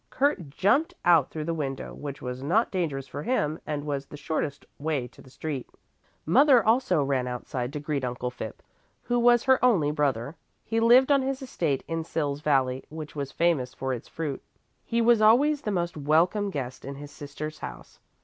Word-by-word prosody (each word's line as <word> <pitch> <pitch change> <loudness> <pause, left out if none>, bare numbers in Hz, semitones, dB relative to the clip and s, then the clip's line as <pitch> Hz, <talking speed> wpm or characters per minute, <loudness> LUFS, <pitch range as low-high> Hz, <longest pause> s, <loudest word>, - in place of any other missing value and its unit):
Kurt 265 - 0
jumped 280 - +2
out 170 -6 +5
through 155 - -5
the 165 - -1
window, 140 -4 -4
which 140 -1 -7
was 125 0 -5
not 175 - +2
dangerous 155 -8 -2
for 145 - -6
him 155 -6 0
and 145 -1 -3
was 140 -2 -3
the 150 - -10
shortest 145 -1 -3
way 145 -4 -1
to - - -17
the 130 - -16
street. 140 -1 -5 0.6
The 160 - -4
mother 265 - +6
also 225 - +3
ran 135 -2 0
outside 125 0 -4
to 150 - -3
greet 145 -2 -2
Uncle 125 0 -3
Phipp 110 -3 -8 0.4
who 240 0 0
was 240 0 +5
her 260 -1 +3
only 185 -13 +4
brother. 140 -2 -1 0.3
He 225 0 0
lived 245 +4 +6
on 280 -1 +5
his 270 +1 -2
estate 165 - -1
in 165 0 -2
Sils 145 -3 -2
valley, 135 -3 +1
which 155 -1 -8
was 140 -2 -4
famous 145 -7 +1
for 130 -1 -2
its 120 - -6
fruit. 150 -4 -4 0.4
He 235 0 0
was 235 -1 +5
always 275 +7 +5
the 220 - -3
most 175 -3 -1
welcome 165 +8 +2
guest 130 -7 -5
in 140 +1 -6
his 145 +1 -9
sister's 150 +2 -7
house. - - -9
155 Hz, 195 wpm, -27 LUFS, 140-215 Hz, 0.6 s, mother